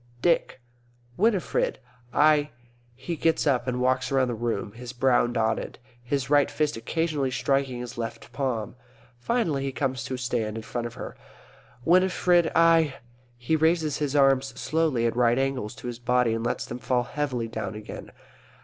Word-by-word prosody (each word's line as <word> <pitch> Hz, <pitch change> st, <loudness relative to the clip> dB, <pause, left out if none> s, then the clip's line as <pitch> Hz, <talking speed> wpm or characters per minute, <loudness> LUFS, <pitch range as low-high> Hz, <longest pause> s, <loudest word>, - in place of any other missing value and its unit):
Dick. 170 Hz, -5 st, +2 dB, 0.6 s
Winifred, 205 Hz, -2 st, +1 dB, 0.3 s
I 150 Hz, +1 st, +4 dB, 0.5 s
_(He 165 Hz, +3 st, -5 dB
gets 165 Hz, -1 st, +2 dB
up 130 Hz, -3 st, +1 dB
and 125 Hz, 0 st, -1 dB
walks 130 Hz, +1 st, +1 dB
round 130 Hz, -2 st, +2 dB
the -, -, -2 dB
room, 115 Hz, -3 st, -2 dB
his 120 Hz, +2 st, -9 dB
brow 125 Hz, -1 st, +3 dB
knotted, 115 Hz, -2 st, -1 dB, 0.2 s
his 130 Hz, +2 st, -2 dB
right 145 Hz, 0 st, +4 dB
fist 150 Hz, -1 st, 0 dB
occasionally 150 Hz, +3 st, -1 dB
striking 135 Hz, -1 st, 0 dB
his 125 Hz, 0 st, -7 dB
left 115 Hz, +1 st, -6 dB
palm. 125 Hz, -5 st, -2 dB, 0.4 s
Finally, 165 Hz, -, 0 dB
he 135 Hz, 0 st, -2 dB
comes 130 Hz, -2 st, -2 dB
to 130 Hz, -, -3 dB
a -, -, -5 dB
stand 120 Hz, -3 st, -2 dB
in 110 Hz, -, -6 dB
front 120 Hz, +2 st, -3 dB
of 120 Hz, -, -11 dB
her.)_ -, -, -7 dB, 0.7 s
Winifred, 180 Hz, -1 st, +4 dB
I 165 Hz, -4 st, +4 dB, 0.4 s
_(He 155 Hz, +6 st, 0 dB
raises 160 Hz, -2 st, +2 dB
his 145 Hz, -1 st, -2 dB
arms 135 Hz, -1 st, +3 dB
slowly 155 Hz, -7 st, +1 dB
at 115 Hz, -, 0 dB
right 120 Hz, 0 st, +3 dB
angles 135 Hz, -5 st, -1 dB
to -, -, -12 dB
his 120 Hz, -1 st, -5 dB
body 125 Hz, -1 st, +2 dB
and 115 Hz, 0 st, -2 dB
lets 120 Hz, -, -1 dB
them 120 Hz, -, -6 dB
fall 125 Hz, +1 st, +1 dB
heavily 125 Hz, -3 st, -2 dB
down 110 Hz, -3 st, -5 dB
again.) 105 Hz, 0 st, -8 dB
130 Hz, 165 wpm, -26 LUFS, 120-150 Hz, 0.7 s, I